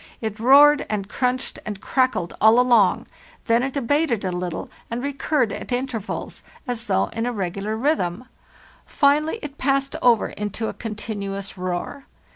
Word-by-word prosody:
It 220 -1 -4
roared 285 +5 +7
and 200 -2 -2
crunched 255 +3 -2
and 210 -2 -5
crackled 255 -10 0
all 220 +3 +6
along; 240 -6 +4 0.4
then 230 0 +3
it 270 +2 -2
abated 275 -4 +1
a 185 - -1
little 180 -1 -4 0.2
and 235 +2 -4
recurred 280 -3 0
at - - -7
intervals, 245 -4 -4 0.2
as 240 -2 -3
though 190 - +1
in 225 +1 -3
a - - 0
regular 200 +1 -3
rhythm; 250 - 0 0.6
finally 300 +6 +2
it 290 -1 -8
passed 275 0 +1
over 235 -3 +4
into 210 +2 -4
a - - -4
continuous 205 -3 -5
roar. 185 +9 -4
230 Hz, 150 wpm, -23 LUFS, 205-270 Hz, 0.6 s, roared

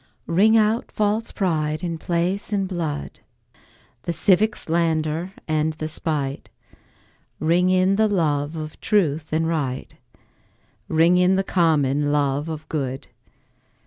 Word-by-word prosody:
Ring 210 +7 +4
out 220 +2 +1
false 215 +2 0
pride 155 -4 -1
in 170 -2 -3
place 175 +6 -1
and 195 -2 0
blood, 165 -6 -4 0.8
The 170 - -3
civic 210 +4 +3
slander 165 +1 -1
and 155 0 0
the 155 0 -5
spite; 145 -3 -3 0.9
Ring 175 +3 +2
in 185 +1 +3
the 220 0 +4
love 155 -6 0
of 155 -1 -7
truth 160 -8 +1
and 160 +1 +1
right, 140 -6 -3 0.9
Ring 165 +3 +4
in 180 +1 +4
the 195 - +1
common 150 -6 +1
love 145 +1 0
of 155 -1 -6
good. 135 -3 -4
165 Hz, 125 wpm, -22 LUFS, 155-185 Hz, 0.9 s, Ring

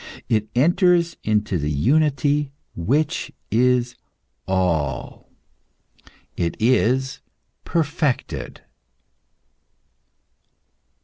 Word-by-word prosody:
It 110 -1 +1
enters 170 +4 +3
into 105 -4 0
the 75 0 -2
unity 145 - +2 0.3
which 145 - 0 0.2
is 125 +1 +2 0.5
All. 85 -9 -1 1.1
It 85 -2 -2
is 130 +3 +2 0.5
perfected. 150 -4 -2
125 Hz, 60 wpm, -22 LUFS, 105-150 Hz, 1.1 s, enters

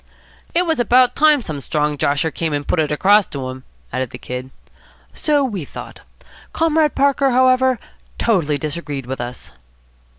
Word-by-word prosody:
"It 355 +1 +3
was 320 -6 0
about 245 +1 +4
time 300 -3 +4
some 150 -6 -5
strong 150 +1 -1
josher 145 +3 0
came 160 -1 -2
and 145 0 -3
put 180 - +1
it 150 -1 +1
across 200 +7 +4
to 135 -2 -5
'em," 130 0 -10 0.3
added 130 0 -2
the - - -9
Kid. 125 +1 -6 0.6
"So 295 -2 +1
we 205 - -3
thought. - - -10 0.5
Comrade 320 -2 +2
Parker, 275 0 +3
however, 255 0 +3 0.4
totally 170 -10 +1
disagreed 145 -2 -5
with 130 0 -5
us." 120 +1 -7
170 Hz, 160 wpm, -19 LUFS, -, 0.6 s, about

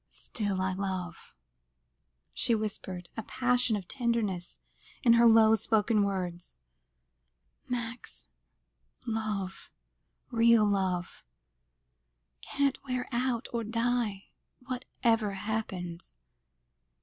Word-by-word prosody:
"Still 205 -4 -3
I 190 0 0
love," 185 -2 -4 1.0
she 235 - +2
whispered, 190 -4 -4
a 225 - -3
passion 250 0 +1
of 195 -4 -5
tenderness 230 -8 -1 0.4
in 235 -3 +7
the 235 0 +7
low 220 -1 +7
spoken 220 0 +3
words. 180 - -3 1.1
"Max, 230 - -4 0.8
love 215 -5 -3 0.6
real 230 -1 +5
love 185 -3 -1 1.2
can't 280 -1 0
wear 255 -2 -2
out 245 -1 0
or 235 -1 -1
die, 230 -2 -1 0.4
whatever 235 -4 0
happens. 190 - -4
220 Hz, 90 wpm, -30 LUFS, 190-235 Hz, 1.2 s, in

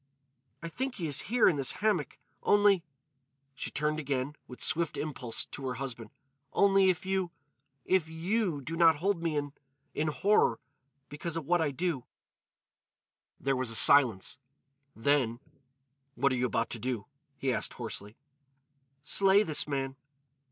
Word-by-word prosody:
"I - - -3
think 260 +9 -4
he 175 - -4
is 145 -3 +1
here 240 0 +4
in 170 - +3
this 135 -2 +1
hammock. 205 -8 -1 0.2
Only——" 205 -3 +4 0.7
she - - -5
turned 150 +1 -1
again, 140 0 -2
with 125 - -11
swift 165 -2 +1
impulse, 130 -6 -3
to 135 -2 -7
her 125 - -3
husband, 125 -4 -6 0.4
"—only 195 -1 +4
if 180 0 -1
you—if 160 -3 -3
you 170 0 -1
do 160 +5 -5
not 165 -1 +5
hold 180 +3 -1
me 165 -2 -1
in—in 145 +1 -5
horror—because 145 - -1
of 160 - -4
what 175 +2 +2
I 160 - +1
do——" 150 -2 -2 1.3
There 135 0 0
was 130 -2 -2
a 115 - -1
silence; 120 -7 +5 0.6
then: 120 -1 +1 0.8
"What 140 +2 +2
are - - +1
you 125 0 +1
about 115 -1 -1
to 120 - -5
do?" 120 -3 -3 0.3
he 130 -1 0
asked - - -2
hoarsely. 105 +3 -6 0.9
"Slay 195 +4 +4
this 155 -6 0
man." 135 -2 -3
145 Hz, 145 wpm, -30 LUFS, 135-175 Hz, 1.3 s, not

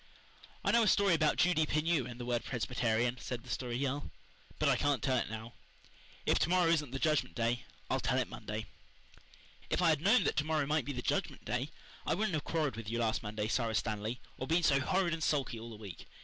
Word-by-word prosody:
"I - - +4
know 235 - +5
a 220 - +3
story 200 -2 +4
about 155 -2 +3
Judy 175 -3 +4
Pineau 155 -3 +1
and 120 0 -8
the 120 - -4
word 120 -1 0
Presbyterian," 120 0 0
said 120 -2 -5
the - - -8
Story 120 -2 -2
Girl, 140 +2 -2 0.5
"but - - +1
I - - +5
can't 145 -3 +1
tell 130 -2 +2
it - - -1
now. 110 +1 -7 0.7
If - - +3
to - - +2
morrow 180 -2 +4
isn't 150 -4 +1
the 135 - -4
Judgment 155 +1 +1
Day 120 0 0 0.2
I'll - - 0
tell - - +1
it - - +1
Monday." 110 +1 -5 1.0
"If - - +1
I 175 -2 +4
had 155 -2 +2
known 210 +8 +5
that - - +1
to 145 - +3
morrow 155 -1 +1
might 150 +2 +1
be 145 - -3
the 125 -3 -4
Judgment - - -1
Day - - -1 0.3
I - - +1
wouldn't 200 -1 0
have 155 - -1
quarrelled 150 -8 -1
with 115 -2 -5
you 115 - -1
last 115 -2 +1
Monday, 105 0 -3
Sara 115 -1 0
Stanley, 110 +2 -2 0.2
or 130 - -3
been 170 +2 +2
so 140 -3 +4
horrid 180 +4 +1
and 165 - -3
sulky 135 -6 0
all 115 +1 -8
the 115 - -8
week. 100 -5 -9
135 Hz, 235 wpm, -33 LUFS, 115-160 Hz, 1.0 s, know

